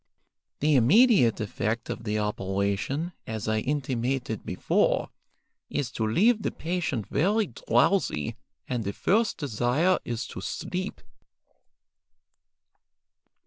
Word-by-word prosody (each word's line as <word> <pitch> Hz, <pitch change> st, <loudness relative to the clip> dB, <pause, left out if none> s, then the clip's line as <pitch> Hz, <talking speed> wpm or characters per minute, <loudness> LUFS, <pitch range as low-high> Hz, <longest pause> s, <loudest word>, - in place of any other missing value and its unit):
The 150 Hz, +1 st, +3 dB
immediate 145 Hz, -, +5 dB
effect 110 Hz, +2 st, -2 dB
of -, -, -5 dB
the 105 Hz, 0 st, 0 dB
operation, 100 Hz, -, -1 dB, 0.2 s
as 110 Hz, -2 st, -4 dB
I 110 Hz, 0 st, +1 dB
intimated 130 Hz, -3 st, -2 dB
before, -, -, +1 dB, 0.6 s
is 130 Hz, -3 st, -2 dB
to 110 Hz, -2 st, -1 dB
leave 215 Hz, -, +3 dB
the -, -, 0 dB
patient 160 Hz, -, -2 dB
very 205 Hz, +8 st, +2 dB
drowsy, 120 Hz, -, +1 dB, 0.3 s
and 125 Hz, -3 st, -2 dB
the 100 Hz, 0 st, -3 dB
first 215 Hz, -, +1 dB
desire 145 Hz, -, +1 dB
is 120 Hz, +1 st, -3 dB
to 95 Hz, -, -7 dB
sleep." 185 Hz, -, -4 dB
125 Hz, 105 wpm, -27 LUFS, 110-175 Hz, 0.6 s, immediate